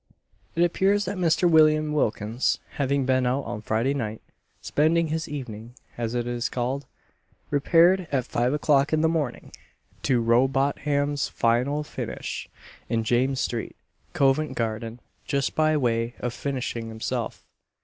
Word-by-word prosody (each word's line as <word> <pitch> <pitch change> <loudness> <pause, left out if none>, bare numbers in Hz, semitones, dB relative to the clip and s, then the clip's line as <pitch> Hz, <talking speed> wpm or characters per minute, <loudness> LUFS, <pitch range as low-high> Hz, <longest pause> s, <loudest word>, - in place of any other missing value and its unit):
It 170 - +3
appears 195 +4 +2
that 190 +1 -4
Mr. 175 0 +3
William 155 -2 +4
Wilkins, 115 -3 0 0.2
having 140 -1 +1
been 130 -1 +2
out 130 +3 0
on 105 - -5
Friday 115 +5 0
night 110 -5 -3 0.4
spending 160 +2 +1
his 160 0 -2
evening, 120 -5 -7 0.2
as 115 0 -3
it 120 -1 -1
is 120 0 -2
called 130 +2 -2 0.6
repaired 170 +5 +4
at 130 -3 0
five 120 +2 0
o'clock 145 0 +2
in 155 - +3
the 160 - +4
morning 155 -7 -2 0.5
to 125 -2 +2
Rowbotham's 135 +4 +1
"final 125 +6 +1
finish," - - -5 0.4
in 115 -1 0
James 130 +4 +1
street, 120 -2 -3 0.4
Covent 135 0 +2
garden, 115 0 -3 0.3
just 140 -1 0
by 155 0 +2
way 115 -2 0
of 120 -1 -3
finishing 125 -3 -3
himself. 110 0 -4
135 Hz, 140 wpm, -25 LUFS, 120-150 Hz, 0.6 s, William